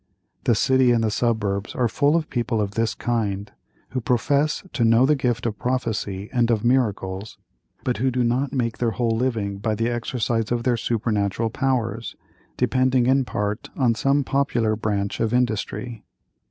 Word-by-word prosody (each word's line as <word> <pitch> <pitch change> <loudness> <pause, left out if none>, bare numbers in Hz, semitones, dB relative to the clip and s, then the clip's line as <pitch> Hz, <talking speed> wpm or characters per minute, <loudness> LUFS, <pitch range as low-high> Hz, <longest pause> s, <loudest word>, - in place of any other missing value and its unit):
The 120 - +4
city 130 +3 +3
and 115 -1 +2
the 110 - +1
suburbs 105 -3 -1
are 125 - +2
full 145 +6 +2
of 165 -2 0
people 120 -3 -1
of 100 -2 -1
this 115 +2 -1
kind, 105 -4 -2 0.4
who 130 - -3
profess 140 +6 +1
to 120 - +1
know 115 +2 +5
the 150 +2 +4
gift 125 -4 -1
of 110 -3 -2
prophecy 110 -6 -2
and 120 -2 +2
of 115 -1 +1
miracles, 105 -5 0 0.5
but 125 -3 -1
who 130 +5 +1
do 125 -1 0
not 125 +3 0
make 115 -4 -2
their 120 - +2
whole 115 0 0
living 110 -5 -1
by 110 +1 -1
the 115 +2 0
exercise 120 -2 -1
of 120 -1 0
their 125 -1 +2
supernatural 110 -1 -1
powers, 120 -4 -1 0.4
depending 130 -1 +2
in 135 +1 +3
part 105 -1 -3
on 125 -4 +3
some 140 +5 +2
popular 125 -5 +1
branch 100 -2 -2
of 115 +1 +1
industry. 115 -1 -2
115 Hz, 170 wpm, -23 LUFS, 110-125 Hz, 0.5 s, know